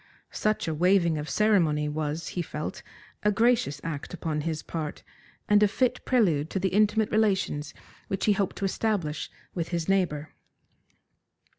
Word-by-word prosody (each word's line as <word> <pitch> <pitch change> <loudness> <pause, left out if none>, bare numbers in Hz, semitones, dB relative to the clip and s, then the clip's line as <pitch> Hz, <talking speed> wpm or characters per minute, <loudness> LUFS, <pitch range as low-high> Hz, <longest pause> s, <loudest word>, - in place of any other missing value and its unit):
Such 215 -4 0
a 160 - 0
waiving 170 -1 +3
of 150 - -5
ceremony 170 -9 +3
was, 150 +1 -3
he 180 - -2
felt, 155 -2 -5 0.4
a 210 - +3
gracious 225 - +2
act 165 +1 -5
upon 155 -3 -2
his 160 0 -3
part, 155 -3 -5 0.4
and 210 0 +5
a 210 - +6
fit 250 +4 0
prelude 170 - +2
to 190 - -2
the 190 +1 +1
intimate 210 +2 +2
relations 195 -9 +1 0.4
which 195 0 -2
he 210 - +5
hoped 200 -2 -1
to 200 - -2
establish 190 -7 -1 0.2
with 170 -2 -2
his 170 -2 -2
neighbour. 170 -6 0
180 Hz, 155 wpm, -27 LUFS, 155-210 Hz, 0.4 s, a